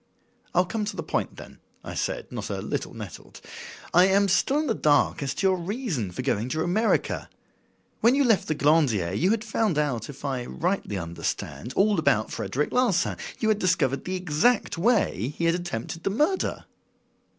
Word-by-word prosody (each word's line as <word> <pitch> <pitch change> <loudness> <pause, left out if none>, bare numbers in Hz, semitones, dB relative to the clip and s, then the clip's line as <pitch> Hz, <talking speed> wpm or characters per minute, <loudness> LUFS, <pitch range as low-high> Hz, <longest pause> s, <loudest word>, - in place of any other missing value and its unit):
"I'll 180 +1 +4
come 210 +5 -3
to 205 - -4
the - - -4
point, - - -2
then," - - -12 0.2
I - - -7
said, - - -3
not - - -5
a - - -3
little - - -4
nettled. - - -9 0.5
"I 180 +1 +7
am 200 +1 +3
still 230 +10 +2
in 310 - +1
the 240 - +1
dark 150 -7 +2
as 135 -1 -2
to - - -1
your 190 -1 +2
reason 180 - -3
for 90 +8 -5
going 120 -2 0
to 155 +3 -1
America. 215 +6 0 0.7
When 235 +3 +4
you 285 - +3
left 225 -6 +3
the 155 - 0
Glandier 135 - +2
you 175 - +2
had 220 0 +1
found 220 -6 0
out, 130 -7 -1
if 145 0 -9
I 130 -3 -2
rightly 175 - -2
understand, 85 +7 -4
all 205 -1 +3
about 110 -8 +2
Frederic 150 +3 -2
Larsan; 250 -7 +2 0.2
you 220 - 0
had 215 -1 +2
discovered 170 - +1
the 185 - -2
exact 185 +7 +1
way 165 - +1
he 170 - 0
had 165 - +4
attempted 170 -3 -4
the - - +1
murder?" 300 - 0
175 Hz, 185 wpm, -26 LUFS, 140-215 Hz, 0.7 s, I